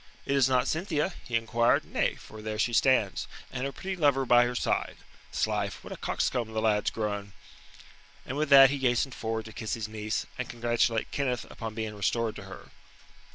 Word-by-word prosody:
"It 140 - 0
is 135 -2 +4
not 130 -1 +2
Cynthia?" 170 +1 -1
he 120 - -3
inquired. 115 +1 +2
"Nay, - - 0
for 110 - -12
there 110 0 -4
she 120 +2 +1
stands 115 -7 +2 0.3
and 125 - -2
her 140 - -2
pretty 190 +6 -5
lover 140 -5 +2
by 120 0 +6
her 125 0 -3
side. - - -1 0.3
'Slife, - - -1
what - - -7
a - - -8
coxcomb 115 -3 -1
the 110 - 0
lad's 105 -1 +2
grown." 105 -2 -4 0.9
And 130 - -5
with 150 0 0
that 135 -1 +9
he 140 - -2
hastened 125 0 +1
forward 110 -1 -3
to 110 - -10
kiss 110 0 -3
his 110 -2 -4
niece, 110 0 -3
and 125 - -3
congratulate 120 -1 0
Kenneth 130 -3 -1
upon 110 -2 -6
being 110 -1 -3
restored 110 +2 0
to 100 - -9
her. 95 - -11
120 Hz, 195 wpm, -28 LUFS, 110-135 Hz, 0.9 s, that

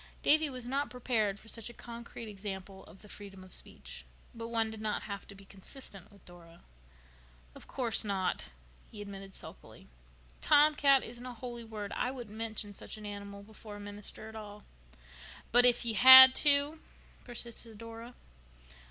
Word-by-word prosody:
Davy 310 0 +5
was 255 -3 -5
not 275 +3 -1
prepared 220 -5 -1
for 225 - -18
such 230 0 -4
a 240 - -13
concrete 235 -1 -9
example 195 -2 -8
of 195 - -16
the - - -14
freedom 195 -2 -11
of 185 - -12
speech. - - -6 0.3
But 230 -1 -7
one 225 -1 -1
did 220 -1 -9
not 215 -1 -2
have 200 -2 -7
to 200 - -12
be 195 0 -15
consistent 195 0 -12
with 200 -2 -20
Dora. 170 -1 -15 0.9
"Of - - -14
course 245 -4 -2
not," 195 -3 -2 0.4
he 210 - -11
admitted 195 -1 -9
sulkily. - - -11 0.5
"'Tomcat' 290 -2 +5
isn't 240 +1 -9
a 250 -1 -7
holy 240 0 -7
word. 215 -3 -7
I - - 0
wouldn't 240 -5 -8
mention 220 -2 -5
such 200 - -9
an 215 - -10
animal 200 -1 -8
before 215 0 -11
a - - -9
minister 205 +1 -7
at 220 - -11
all." 210 -1 -9 0.9
"But 245 +1 +8
if 240 -1 +4
you 230 - 0
had 260 +3 +11
to?" 290 +2 +4 0.4
persisted 235 -2 -6
Dora. 230 +2 -10
220 Hz, 170 wpm, -32 LUFS, 205-245 Hz, 0.9 s, had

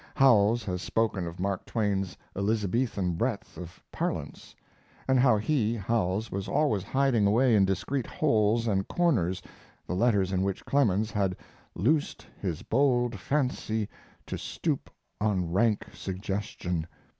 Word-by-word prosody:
Howells 115 -3 +5
has 90 -3 -3
spoken 105 -5 0
of 85 +1 -8
Mark 95 0 -1
Twain's 100 -5 -1 0.2
"Elizabethan 100 -1 0
breadth 115 0 -2
of 90 -1 -10
parlance," - - -4 0.5
and 130 -1 +4
how 125 -4 +5
he, 115 0 +1
Howells, 105 -1 -1
was 95 0 -3
always 110 -10 +1
hiding 125 0 +2
away 120 +3 +4
in 100 -2 +5
discreet 115 +8 -1
holes 115 - +2
and 95 -3 0
corners 110 - +1 0.4
the - - -3
letters 100 -2 +2
in 95 -1 +1
which 95 0 -2
Clemens 110 -7 +2
had 95 -3 0 0.4
"loosed 145 - 0 0.2
his 90 -6 -3
bold 120 -2 +2
fancy 125 -6 -1 0.4
to - - -5
stoop - - -3 0.3
on 95 -5 0
rank 105 +2 +2
suggestion." 95 -3 -3
105 Hz, 135 wpm, -28 LUFS, 95-120 Hz, 0.5 s, Howells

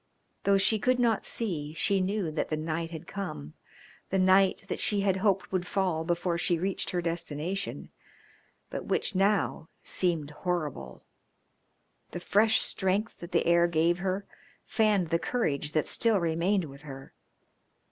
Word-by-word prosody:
Though 200 0 +5
she 210 +3 +3
could 255 +4 +2
not 235 -4 +2
see 160 -9 -3
she 195 +4 +2
knew 190 -3 -1
that 155 - -2
the 155 - -1
night 165 +1 -3
had 160 -2 -8
come, 75 - -6 0.6
the 195 - 0
night 190 +1 +4
that - - -3
she 205 -2 +2
had 195 -1 +1
hoped 195 -1 +1
would 185 -1 -1
fall 180 -5 0
before 170 0 -1
she 175 -1 +2
reached 190 +3 -2
her 175 -1 -1
destination, 170 +2 -4 0.8
but - - -5
which - - -1
now 195 -4 +1
seemed 165 -5 -1
horrible. 150 - -4 1.1
The 175 - -3
fresh 215 +5 +4
strength 195 +3 0
that 170 +1 -9
the 170 - +2
air 170 0 +4
gave 170 +1 +2
her 190 +1 -2 0.4
fanned 210 -6 +2
the 165 - +1
courage 150 - -1
that 155 - +1
still 225 -4 +2
remained 170 +4 +1
with 140 -1 -12
her. 135 -3 -10
180 Hz, 155 wpm, -29 LUFS, 160-195 Hz, 1.1 s, Though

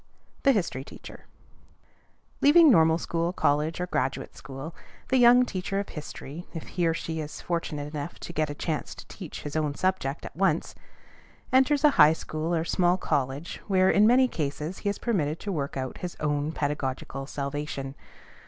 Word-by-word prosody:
THE 275 - +5
HISTORY 175 - -1
TEACHER. - - -12 1.2
Leaving 310 +1 +7
normal 160 -5 +5
school, 170 0 -1
college, 150 -1 +1
or 180 - 0
graduate 180 - -2
school, 135 +4 -8 0.4
the 260 - +3
young 245 +1 +7
teacher 195 -2 -3
of 200 - -4
history, 150 +1 -8
if 165 - -6
he 175 -2 0
or 165 - +1
she 160 -1 -4
is 155 -1 -6
fortunate 150 -4 -3
enough 150 +2 -5
to 170 - -7
get 155 -2 0
a 145 - -5
chance 155 0 -3
to - - -12
teach 180 -6 -8
his 145 - -6
own 150 -2 0
subject 185 -6 -1
at - - -9
once, 175 -3 +1 0.8
enters 270 +3 +4
a 300 - +7
high 150 +1 +8
school, 160 +1 -3
or 165 0 0
small 180 +1 +2
college, 140 0 -2
where, 190 -2 +4
in 210 +1 +5
many 255 +2 +5
cases, 155 - -4
he 205 - -1
is 200 - -2
permitted 165 -10 -1
to 205 - -3
work 140 -6 -3
out 130 -1 -4
his 180 -1 -6
own 145 0 0
pedagogical 140 -2 -3
salvation. 140 -1 -4
160 Hz, 175 wpm, -27 LUFS, 145-190 Hz, 1.2 s, high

